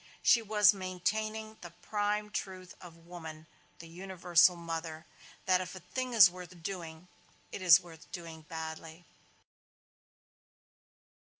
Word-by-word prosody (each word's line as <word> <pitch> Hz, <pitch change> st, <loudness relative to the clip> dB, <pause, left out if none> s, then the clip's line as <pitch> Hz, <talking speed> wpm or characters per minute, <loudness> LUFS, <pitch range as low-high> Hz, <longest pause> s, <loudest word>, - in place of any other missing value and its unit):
She 235 Hz, -, +5 dB
was 210 Hz, -1 st, +5 dB
maintaining 215 Hz, +4 st, -3 dB
the 175 Hz, -, -8 dB
prime 210 Hz, +4 st, -2 dB
truth 185 Hz, -3 st, -6 dB
of 170 Hz, -2 st, -14 dB
woman, 160 Hz, -3 st, -9 dB, 0.3 s
the 165 Hz, -, -11 dB
universal 180 Hz, 0 st, +3 dB
mother: 165 Hz, -1 st, -6 dB, 0.4 s
that 185 Hz, -1 st, +3 dB
if 185 Hz, -, -7 dB
a -, -, -8 dB
thing 255 Hz, +8 st, -5 dB
is 205 Hz, -6 st, +10 dB
worth 180 Hz, -1 st, -11 dB
doing, 170 Hz, -2 st, -6 dB, 0.4 s
it -, -, -6 dB
is 175 Hz, -3 st, +8 dB
worth 165 Hz, -3 st, -15 dB
doing 165 Hz, -3 st, -8 dB
badly. 160 Hz, +2 st, -8 dB
180 Hz, 120 wpm, -31 LUFS, 165-195 Hz, 0.4 s, is